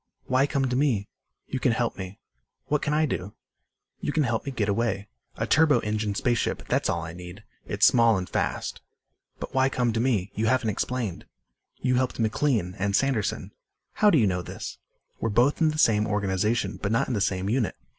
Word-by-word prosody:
"Why 130 +2 +2
come 140 -2 0
to 125 - -1
me?" 125 -8 +1 0.4
"You - - -4
can - - +2
help - - -1
me." 95 0 -7 0.5
"What 150 0 0
can 150 - -1
I 155 +1 +3
do?" 105 -7 -4 0.6
"You - - -2
can 155 0 +2
help 115 -3 -1
me - - -1
get 110 -6 -1
away. 100 -1 -1 0.3
A - - -1
turbo 155 0 +4
engine 105 -1 -2
space 120 +1 +1
ship. - - -2
That's - - +1
all 85 - -1
I 80 -1 -6
need. 90 +3 -10 0.2
It's 105 0 +3
small 115 -4 +5
and 90 -1 -3
fast." - - -2 0.6
"But - - -6
why 130 0 +3
come 125 -3 0
to 115 - -1
me? 110 -6 0
You 110 +2 0
haven't 125 -3 +2
explained." 115 -2 -3 0.6
"You 125 -1 +2
helped 130 0 0
McLean 110 -4 0
and 100 +1 +1
Sanderson." 130 -5 0 0.4
"How 210 - +4
do 165 - +4
you 115 - +4
know 90 -2 0
this?" - - -7 0.4
"We're 115 - -1
both 120 +9 +2
in 160 - +5
the 155 - -3
same 110 -7 +3
organization 105 0 0
but 100 - -1
not 115 - +2
in 130 - -2
the 105 - 0
same 95 -1 0
unit. 115 -2 0
115 Hz, 205 wpm, -26 LUFS, 100-130 Hz, 0.6 s, small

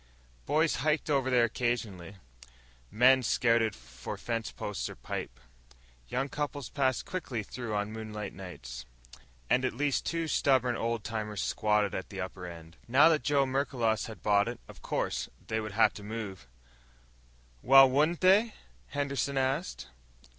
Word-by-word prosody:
Boys 155 +2 +2
hiked 150 +2 0
over 135 -2 +2
there 125 -2 +4
occasionally. 110 -6 -2 0.7
Men 130 +4 +5
scouted 115 -2 +2
for 65 0 -8
fence 115 -1 -3
posts 105 - -4
or - - -9
pipe. - - -6 0.7
Young 135 +2 -1
couples 145 -2 -4
passed 130 -3 0
quickly 135 - -4
through 115 0 -5
on 105 +1 -1
moonlight 110 -2 -6
nights. 65 -10 -8 0.6
And 125 - +2
at 130 - -1
least 145 -1 +1
two 165 -1 -2
stubborn 130 -5 +2
old 115 -2 -2
timers 105 -3 -3
still - - 0
squatted 105 -2 +1
at 95 - -4
the 100 - -7
upper 90 -1 -5
end. 85 -1 -11
Now 135 +7 +6
that 155 -2 +2
Joe 140 -2 +2
Merklos 130 -4 0
had 110 - -10
bought 100 0 +3
it, 120 0 -5
of - - -13
course, - - -2 0.2
they 110 - -1
would 105 -2 -5
have 110 - +4
to - - -9
move. 100 - -6 1.1
"Well, 135 +1 +8
won't 150 +6 +1
they?" 205 +5 +4 0.3
Henderson 140 -1 -2
asked. 135 +6 -1
120 Hz, 155 wpm, -30 LUFS, 105-140 Hz, 1.1 s, Well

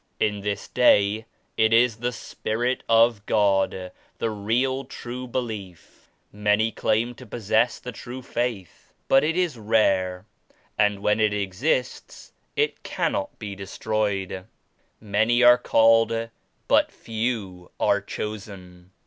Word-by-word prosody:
In 105 -1 0
this 100 0 -3
day 110 -3 +3 0.3
it 110 0 +3
is 115 0 +4
the 120 +2 -2
Spirit 120 +1 -3
of 115 -2 +4
God, 95 -3 +1 0.3
the 115 - -1
real 120 +6 0
true 125 -1 -7
belief. 110 -8 -6 0.2
Many 105 +2 +1
claim 110 +3 0
to 125 +1 -13
possess 110 +2 +1
the 125 - -7
true 125 +2 -9
Faith 120 - -4
but 135 +1 +5
it 165 +3 0
is 170 -10 0
rare 95 -4 +1 0.5
and 105 -1 +1
when 105 +1 +2
it 105 -1 +2
exists 105 - -2 0.2
it 440 0 0
cannot 295 0 -2
be 105 -3 -6
de 95 0 -8
stroyed. 100 -3 -2 0.5
'Many 110 +4 +2
are 120 0 +8
called 115 0 +3 0.4
but - - +3
few 110 -6 -4
are 100 - +2
chosen.' 95 -4 -8
110 Hz, 125 wpm, -24 LUFS, 100-120 Hz, 0.5 s, are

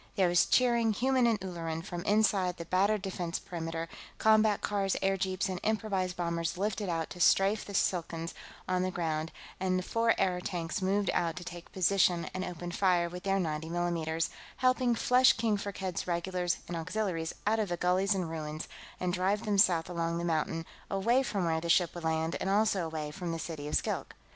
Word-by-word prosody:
There 185 -3 +3
was 175 0 +4
cheering, 235 -3 +3
human 255 +3 +2
and 225 -3 +2
Ulleran, 165 -3 -4
from 175 -2 -5
inside 200 -4 +2
the 170 - -6
battered 195 +3 +2
defense 175 -3 -3
perimeter; 165 -1 -5 0.3
combat 215 -1 +4
cars, 195 -2 0
airjeeps, 190 -1 0
and 185 -1 -3
improvised 200 -4 -1
bombers 170 -1 -1
lifted 205 0 -1
out 165 -2 -2
to 180 - -8
strafe 195 +4 +4
the 200 - -7
Skilkans 165 -2 -1 0.3
on 185 0 +1
the 185 - 0
ground, 160 -3 -2 0.3
and 185 -1 +1
the 185 - -2
four 230 +3 +2
airtanks 180 -1 -1
moved 195 +1 +1
out 165 -2 0
to 180 - -6
take 175 -1 -9
position 185 -2 +2
and 185 - -3
open 175 -1 -5
fire 175 -2 +2
with 180 +1 -7
their 195 0 +1
90 160 -2 -2
mm's, 165 -2 -1 0.3
helping 255 -1 +2
to - - -6
flush 250 +1 +5
King 225 -2 +1
Firkked's 190 -3 -4
regulars 175 0 -1
and 175 - -4
auxiliaries 170 -1 -2
out 220 +2 +2
of 210 -3 0
the 175 - -1
gullies 185 +3 +2
and 185 -3 -1
ruins 155 -1 -5 0.3
and 180 -1 -1
drive 195 +3 0
them 205 -2 +1
south 170 -4 +4
along 170 -1 -2
the 170 - -2
mountain, 165 0 -1 0.2
away 230 +7 +2
from 200 -8 -1
where 160 -1 0
the 170 - -4
ship 175 0 +4
would 175 - -7
land 160 +1 0
and 190 - -1
also 200 -3 +2
away 155 -2 -4
from 175 +2 -4
the 165 - -2
city 160 -3 -5
of 150 - -2
Skilk. - - -2
180 Hz, 195 wpm, -31 LUFS, 170-200 Hz, 0.3 s, flush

